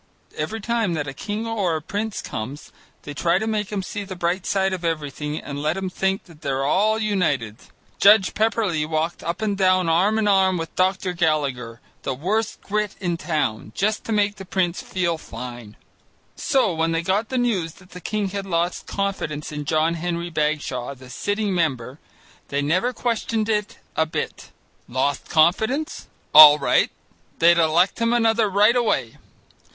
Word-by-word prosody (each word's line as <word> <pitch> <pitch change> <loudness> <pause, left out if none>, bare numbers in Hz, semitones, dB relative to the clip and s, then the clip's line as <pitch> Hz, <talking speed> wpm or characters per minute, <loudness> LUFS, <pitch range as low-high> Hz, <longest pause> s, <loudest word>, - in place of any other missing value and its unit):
Every 160 +9 -3
time 225 -5 0
that 145 -2 -3
a 135 - -5
king 210 +8 -4
or 205 -7 0
a - - -1
prince 205 +7 -4
comes, 130 +7 -6 0.3
they 145 - -7
try 170 +4 +1
to 220 - -2
make 215 -2 -2
him 200 -2 -2
see 205 +1 -5
the 190 -1 -7
bright 175 +1 -1
side 190 -1 +1
of 180 -2 -4
everything 150 -2 -3
and 145 -2 -6
let 155 +4 0
him 190 -1 -3
think 190 +1 -1
that 165 -3 -18
they're 135 -2 -1
all 210 +9 +2
united. 160 - 0 0.4
Judge 200 -1 +6
Pepperleigh 210 -8 0
walked 160 +1 -1
up 170 +6 -3
and 205 -2 0
down 185 -2 +3
arm 190 +7 +3
in 220 -1 +1
arm 190 -2 +3
with 165 -1 -6
Dr. 185 0 +1
Gallagher, 140 -9 -1 0.2
the 135 - -3
worst 205 - -2
Grit 210 0 -2
in 180 -3 -1
the 170 - -2
town, 145 -11 -2
just 210 +2 0
to - - -4
make 205 -1 +1
the 195 - -8
prince 180 -2 -1
feel 175 -3 -2
fine. 120 -4 -9 0.6
So 260 -9 +1
when 165 0 0
they 165 +1 0
got 200 +5 0
the 260 - -2
news 200 -10 0
that 180 0 -19
the 180 - -10
king 210 0 -2
had 195 0 -5
lost 170 0 -1
confidence 190 -8 -3
in 150 -1 -5
John 155 +2 +1
Henry 170 0 -3
Bagshaw, 150 -4 -2
the 130 0 -13
sitting 205 - -1
member, 135 -6 -1 0.5
they 140 0 -1
never 180 - +1
questioned 230 -2 -1
it 210 -2 -1 0.2
a 160 - +2
bit. 155 - -5 0.4
Lost 130 +3 -1
confidence? 220 - +1 0.3
All 150 -1 +11
right, 140 - +2 0.5
they'd 170 +1 +5
elect 170 +5 +3
him 230 0 +2
another 225 -2 +3
right 210 +4 +4
away. 135 - 0
180 Hz, 175 wpm, -22 LUFS, 155-205 Hz, 0.6 s, All